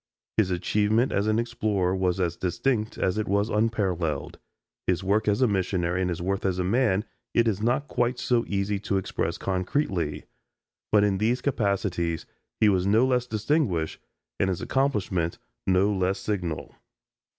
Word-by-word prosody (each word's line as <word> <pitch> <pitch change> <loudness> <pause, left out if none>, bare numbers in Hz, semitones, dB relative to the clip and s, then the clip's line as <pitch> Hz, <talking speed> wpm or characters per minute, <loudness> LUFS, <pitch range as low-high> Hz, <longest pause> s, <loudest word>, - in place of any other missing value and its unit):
His 105 -4 +3
achievement 105 +6 +1
as 100 +1 +1
an 110 0 +2
explorer 105 -6 0
was 95 -1 0
as 85 -2 0
distinct 110 +6 -1
as 95 +3 0
it 110 - -2
was 100 +3 +1
unparalleled. 90 -8 -1 0.5
His 90 +1 +1
work 100 +3 +1
as 105 +5 +3
a - - +5
missionary 90 -3 0
and 90 - 0
his 85 -1 -3
worth 95 +1 -1
as 95 -2 0
a 90 - 0
man 105 0 +2 0.3
it 115 0 +4
is 105 -2 0
not 120 +6 +1
quite 120 +1 0
so 120 -2 +1
easy 100 0 -1
to 100 0 -1
express 95 - -2
concretely; 90 - -1 0.7
but 105 -1 +5
in 100 -2 +1
these 115 +4 +2
capacities 100 - -1 0.3
he 110 - +5
was 95 -2 +2
no 110 +5 +4
less 125 -1 +1
distinguished 110 - 0 0.4
and 95 - +2
his 90 - -1
accomplishment 100 -11 0 0.3
no 95 +2 +3
less 95 0 0
signal. 90 -7 -3
100 Hz, 160 wpm, -26 LUFS, 90-110 Hz, 0.7 s, a